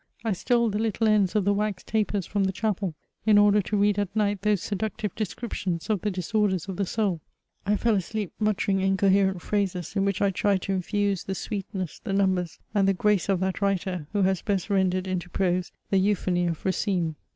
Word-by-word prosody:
I 225 Hz, -, +1 dB
stole 235 Hz, +4 st, +1 dB
the 210 Hz, -, -1 dB
little 225 Hz, 0 st, +1 dB
ends 210 Hz, -2 st, +3 dB
of 205 Hz, -3 st, +2 dB
the 200 Hz, -, +3 dB
wax 205 Hz, -2 st, -1 dB
tapers 210 Hz, -3 st, -1 dB
from 200 Hz, +1 st, 0 dB
the 190 Hz, -, +1 dB
chapel, 195 Hz, -4 st, -2 dB, 0.3 s
in 210 Hz, -1 st, +6 dB
order 205 Hz, 0 st, +5 dB
to 210 Hz, +2 st, -2 dB
read 205 Hz, 0 st, +3 dB
at 205 Hz, 0 st, -2 dB
night 205 Hz, -2 st, +1 dB
those 210 Hz, -2 st, +1 dB
seductive 210 Hz, 0 st, -3 dB
descriptions 195 Hz, -4 st, -3 dB
of 205 Hz, -5 st, 0 dB
the 210 Hz, -, 0 dB
disorders 190 Hz, 0 st, 0 dB
of 190 Hz, -2 st, -5 dB
the 200 Hz, -, -1 dB
soul. 195 Hz, -7 st, -1 dB, 0.5 s
I 210 Hz, 0 st, +3 dB
fell 230 Hz, +1 st, +2 dB
asleep 205 Hz, 0 st, -2 dB
muttering 205 Hz, -2 st, +1 dB
inco 195 Hz, +1 st, +3 dB
herent 190 Hz, -2 st, +2 dB
phrases, 195 Hz, -3 st, -2 dB
in 195 Hz, -, +2 dB
which 200 Hz, -2 st, 0 dB
I 200 Hz, -1 st, +2 dB
tried 195 Hz, 0 st, +1 dB
to 195 Hz, -, -1 dB
infuse 200 Hz, +1 st, -1 dB
the 190 Hz, -, -3 dB
sweetness, 195 Hz, -3 st, -4 dB
the 200 Hz, -, -3 dB
numbers, 190 Hz, -3 st, +1 dB, 0.2 s
and 200 Hz, -2 st, +3 dB
the 195 Hz, -, +3 dB
grace 205 Hz, -1 st, +1 dB
of 190 Hz, -2 st, +2 dB
that 190 Hz, +1 st, -1 dB
writer, 190 Hz, -5 st, -1 dB
who 205 Hz, -1 st, +1 dB
has 190 Hz, -2 st, +1 dB
best 200 Hz, -1 st, -1 dB
rendered 185 Hz, -1 st, +2 dB
into 185 Hz, -2 st, -3 dB
prose 180 Hz, -1 st, 0 dB, 0.2 s
the 195 Hz, -, +4 dB
euphony 185 Hz, -3 st, +1 dB
of 165 Hz, -2 st, -4 dB
Racine. 185 Hz, -3 st, 0 dB
195 Hz, 205 wpm, -26 LUFS, 185-210 Hz, 0.5 s, in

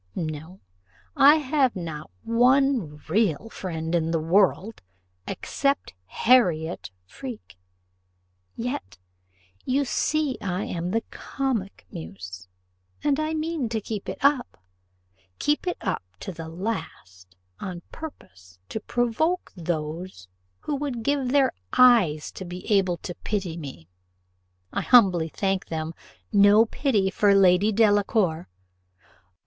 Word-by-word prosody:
No, 160 Hz, +3 st, -5 dB, 0.5 s
I 285 Hz, +2 st, +8 dB
have 280 Hz, -4 st, +1 dB
not 165 Hz, -2 st, -6 dB
one 245 Hz, -, +3 dB
real 200 Hz, +1 st, +1 dB
friend 165 Hz, -3 st, -4 dB
in 165 Hz, -2 st, +1 dB
the 165 Hz, -1 st, +1 dB
world 190 Hz, +5 st, +2 dB, 0.5 s
except 275 Hz, 0 st, -1 dB
Harriot 175 Hz, -, +2 dB, 0.2 s
Freke; 240 Hz, -, -9 dB, 1.0 s
yet, 160 Hz, -, -4 dB, 0.7 s
you 275 Hz, +2 st, +1 dB
see 295 Hz, 0 st, 0 dB
I 185 Hz, 0 st, -2 dB
am 175 Hz, 0 st, -3 dB
the 225 Hz, +4 st, 0 dB
comic 235 Hz, -, -3 dB
muse, 90 Hz, +2 st, -8 dB, 0.6 s
and 290 Hz, -1 st, +2 dB, 0.2 s
mean 310 Hz, -6 st, -2 dB
to 225 Hz, -1 st, -1 dB
keep 210 Hz, -1 st, -5 dB
it -, -, -4 dB
up 280 Hz, -3 st, +2 dB, 0.8 s
keep 295 Hz, +5 st, 0 dB
it 355 Hz, -, -1 dB
up -, -, -1 dB, 0.2 s
to -, -, -5 dB
the 165 Hz, -2 st, -8 dB
last 95 Hz, -, -6 dB, 0.2 s
on 180 Hz, -3 st, -6 dB
purpose 90 Hz, -, -11 dB
to -, -, -3 dB
provoke 245 Hz, -, 0 dB
those 160 Hz, -, -4 dB, 0.3 s
who 295 Hz, -, -2 dB
would 270 Hz, -5 st, -3 dB
give 280 Hz, -1 st, 0 dB
their 275 Hz, -1 st, +4 dB, 0.2 s
eyes 220 Hz, -12 st, +5 dB
to -, -, -8 dB
be 180 Hz, 0 st, -8 dB
able 190 Hz, -3 st, +2 dB
to 175 Hz, -, -6 dB
pity 190 Hz, -6 st, -2 dB
me; 135 Hz, -, -9 dB, 0.9 s
I -, -, 0 dB
humbly 185 Hz, -9 st, +5 dB
thank 195 Hz, +2 st, -1 dB
them, 160 Hz, 0 st, -4 dB, 0.4 s
no 205 Hz, +2 st, +7 dB
pity 220 Hz, -6 st, 0 dB
for 200 Hz, 0 st, +4 dB
Lady 195 Hz, +2 st, +5 dB
Delacour. 205 Hz, -, +2 dB
195 Hz, 120 wpm, -25 LUFS, 165-245 Hz, 1.0 s, I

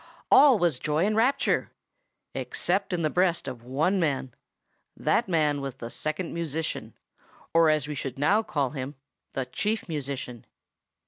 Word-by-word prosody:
All 275 Hz, -4 st, +8 dB
was 170 Hz, -9 st, +1 dB
joy 155 Hz, +3 st, +1 dB
and 215 Hz, +1 st, +1 dB
rapture, 255 Hz, +5 st, +2 dB, 0.6 s
except 195 Hz, +3 st, -1 dB
in 175 Hz, -2 st, -1 dB
the 155 Hz, -, +2 dB
breast 175 Hz, -4 st, +1 dB
of 125 Hz, -3 st, -6 dB
one 150 Hz, +11 st, +1 dB
man; 135 Hz, -6 st, -1 dB, 0.6 s
that -, -, +1 dB
man 150 Hz, -4 st, +2 dB
was 135 Hz, -2 st, -5 dB
the 120 Hz, -3 st, -7 dB
Second 155 Hz, +3 st, -3 dB
Musician, 160 Hz, -1 st, -3 dB, 0.6 s
or, 165 Hz, -1 st, +5 dB
as 155 Hz, -2 st, +1 dB
we 150 Hz, -, -3 dB
should 135 Hz, -3 st, -5 dB
now 195 Hz, +10 st, +3 dB
call 145 Hz, -, -1 dB
him, 140 Hz, 0 st, -5 dB, 0.4 s
the 135 Hz, -, -2 dB
Chief 215 Hz, -, -2 dB
Musician. 135 Hz, -6 st, -5 dB
155 Hz, 150 wpm, -27 LUFS, 135-180 Hz, 0.6 s, All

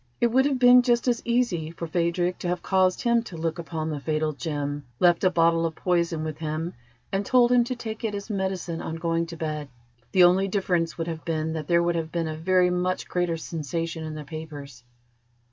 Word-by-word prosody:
It 235 Hz, -, +2 dB
would 265 Hz, +3 st, +4 dB
have 280 Hz, -2 st, +1 dB
been 250 Hz, 0 st, +7 dB
just 240 Hz, 0 st, +1 dB
as 240 Hz, -2 st, +2 dB
easy 235 Hz, -10 st, 0 dB
for 170 Hz, +1 st, -6 dB
Phadrig 175 Hz, +2 st, 0 dB
to -, -, -4 dB
have 175 Hz, 0 st, -2 dB
caused 185 Hz, -1 st, +2 dB
him 235 Hz, -1 st, +3 dB
to 185 Hz, -7 st, -9 dB
look 165 Hz, +1 st, -2 dB
upon 160 Hz, -1 st, -4 dB
the 150 Hz, -, -3 dB
fatal 155 Hz, +1 st, -1 dB
gem, 145 Hz, -1 st, -3 dB, 0.2 s
left 175 Hz, 0 st, +4 dB
a 185 Hz, -, +5 dB
bottle 165 Hz, -1 st, +3 dB
of 165 Hz, -1 st, -2 dB
poison 170 Hz, -3 st, 0 dB
with 155 Hz, -1 st, -5 dB
him, 160 Hz, +2 st, -3 dB, 0.4 s
and 195 Hz, +1 st, 0 dB
told 245 Hz, +2 st, +4 dB
him 245 Hz, -1 st, +5 dB
to 255 Hz, +1 st, -3 dB
take 220 Hz, -2 st, -6 dB
it 215 Hz, -2 st, -1 dB
as 200 Hz, 0 st, -6 dB
medicine 190 Hz, -5 st, -3 dB
on 160 Hz, -, -4 dB
going 165 Hz, 0 st, -1 dB
to 170 Hz, 0 st, -8 dB
bed. 150 Hz, -2 st, -4 dB, 0.4 s
The 185 Hz, -, +6 dB
only 185 Hz, +2 st, +5 dB
difference 180 Hz, -4 st, 0 dB
would 165 Hz, -, -2 dB
have 165 Hz, -1 st, -5 dB
been 160 Hz, -1 st, -2 dB
that 155 Hz, -2 st, -4 dB
there 170 Hz, 0 st, +3 dB
would 175 Hz, 0 st, +1 dB
have 165 Hz, -1 st, -3 dB
been 170 Hz, -2 st, -1 dB
a 155 Hz, -, -4 dB
very 180 Hz, +2 st, +2 dB
much 180 Hz, +1 st, -1 dB
greater 175 Hz, -2 st, -1 dB
sensation 165 Hz, +1 st, -4 dB
in 155 Hz, -1 st, -5 dB
the 155 Hz, -, -6 dB
papers. 145 Hz, -5 st, -9 dB
170 Hz, 220 wpm, -25 LUFS, 160-190 Hz, 0.4 s, been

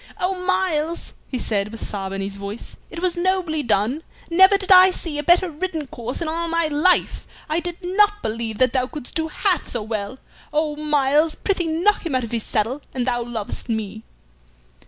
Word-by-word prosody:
"Oh, 365 Hz, 0 st, -1 dB
Myles!" 340 Hz, -4 st, 0 dB
he 255 Hz, -, -3 dB
said, 205 Hz, -4 st, 0 dB
with 225 Hz, +1 st, -6 dB
sob 195 Hz, -2 st, -3 dB
in 195 Hz, 0 st, -3 dB
his 195 Hz, 0 st, -4 dB
voice, 200 Hz, +3 st, -6 dB
"it 340 Hz, -, -7 dB
was 365 Hz, -1 st, +1 dB
nobly 350 Hz, -3 st, 0 dB
done. 235 Hz, +4 st, +1 dB, 0.3 s
Never 380 Hz, +4 st, +7 dB
did 390 Hz, 0 st, -2 dB
I 370 Hz, 0 st, +9 dB
see 330 Hz, -5 st, -4 dB
a -, -, -2 dB
better 350 Hz, +3 st, +4 dB
ridden 320 Hz, -1 st, -3 dB
course 245 Hz, +1 st, -4 dB
in -, -, -3 dB
all 335 Hz, +2 st, -2 dB
my 335 Hz, 0 st, +1 dB
life. 310 Hz, +5 st, +2 dB, 0.2 s
I 310 Hz, +2 st, 0 dB
did 350 Hz, 0 st, -5 dB
not 415 Hz, +3 st, +2 dB
believe 220 Hz, 0 st, -3 dB
that 255 Hz, 0 st, +3 dB
thou 255 Hz, -1 st, +1 dB
couldst 295 Hz, -2 st, -9 dB
do 320 Hz, -1 st, -1 dB
half 365 Hz, +4 st, 0 dB
so 235 Hz, -3 st, -1 dB
well. 215 Hz, +2 st, -4 dB, 0.3 s
Oh, 300 Hz, 0 st, 0 dB
Myles, 300 Hz, +1 st, +2 dB
prithee 375 Hz, -4 st, -1 dB
knock 345 Hz, +6 st, +2 dB
him 325 Hz, -6 st, -2 dB
out 255 Hz, -, +1 dB
of 230 Hz, -, -6 dB
his 230 Hz, -1 st, -1 dB
saddle 225 Hz, +7 st, -1 dB
an 250 Hz, -, 0 dB
thou 240 Hz, -1 st, 0 dB
lovest 235 Hz, -1 st, -5 dB
me!" 220 Hz, -1 st, -3 dB
300 Hz, 200 wpm, -22 LUFS, 235-350 Hz, 0.3 s, I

